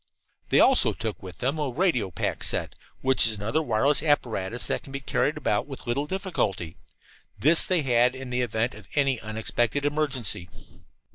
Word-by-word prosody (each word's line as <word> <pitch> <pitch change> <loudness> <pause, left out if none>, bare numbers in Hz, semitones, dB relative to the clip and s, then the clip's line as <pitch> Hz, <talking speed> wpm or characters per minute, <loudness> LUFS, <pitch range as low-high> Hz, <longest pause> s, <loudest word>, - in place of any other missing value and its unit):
They - - +4
also - - +5
took 110 -2 -5
with 95 -1 -10
them 135 +5 -1
a 145 -2 -1
radio 125 - 0
pack 85 - -3
set, - - 0 0.3
which 130 -2 +5
is 110 - +3
another 110 +9 -1
wireless 135 +1 +2
apparatus 120 -7 0
that - - -1
can 135 - -12
be 135 - -4
carried 135 - -1
about - - 0
with - - -9
little 140 +5 -1
difficulty. 165 - -2 0.6
This 160 +4 +5
they 180 -5 +2
had 125 -1 +3
in 130 -1 -8
the 125 0 0
event 115 0 -1
of 105 -1 -13
any 135 -4 +2
unexpected 110 +5 -1
emergency. 140 - -1
125 Hz, 170 wpm, -26 LUFS, 110-145 Hz, 0.6 s, also